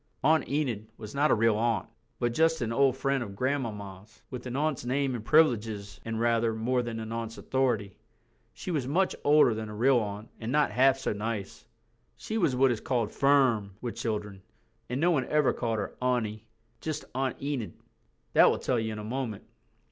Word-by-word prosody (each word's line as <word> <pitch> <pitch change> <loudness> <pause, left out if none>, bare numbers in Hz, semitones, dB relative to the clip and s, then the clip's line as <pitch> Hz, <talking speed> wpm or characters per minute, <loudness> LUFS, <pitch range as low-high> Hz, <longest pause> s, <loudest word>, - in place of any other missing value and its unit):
Aunt 160 +2 +3
Enid 125 -8 -1
was 110 -1 -9
not 145 +2 +2
a - - +5
real 115 -1 +3
aunt, 115 -4 0 0.3
but 120 -1 0
just 160 +3 +3
an 115 0 -2
old 135 0 +3
friend 135 0 0
of 100 -4 -6
Grandmamma's, 110 -5 -4
with 125 -1 -6
an 125 - -5
aunt's 150 -2 0
name 135 +2 0
and 115 -3 -4
privileges 110 -8 +2
and 115 0 -3
rather 115 -1 +2
more 125 +3 0
than 115 -2 -4
an 110 0 -6
aunt's 115 0 -4
authority. 120 -7 0 0.6
She 185 - -6
was 145 -6 -1
much 185 +7 +1
older 145 -5 +5
than 110 0 -5
a 105 - -7
real 125 +3 +4
aunt 105 0 -5
and 115 +1 -4
not 150 +1 +2
half 135 +1 +4
so 135 - -2
nice. 105 -1 -5 0.5
She 220 - -3
was 160 -9 +2
what 130 0 +4
is 115 - -2
called 120 -5 -1
"firm" 130 -8 +2
with 120 -2 -4
children, 105 -4 -4 0.5
and 125 +2 -2
no 175 +3 +3
one 135 -6 +1
ever 150 -2 +3
called 115 -2 -2
her 105 - -4
auntie. 115 -4 -1 0.3
Just 155 -1 -4
Aunt 130 0 -2
Enid. 140 -6 -3 0.6
That - - +7
will - - +1
tell 125 -2 0
you 110 0 -2
in - - -6
a 105 - -6
moment. 115 -2 -4
120 Hz, 195 wpm, -28 LUFS, 110-135 Hz, 0.6 s, That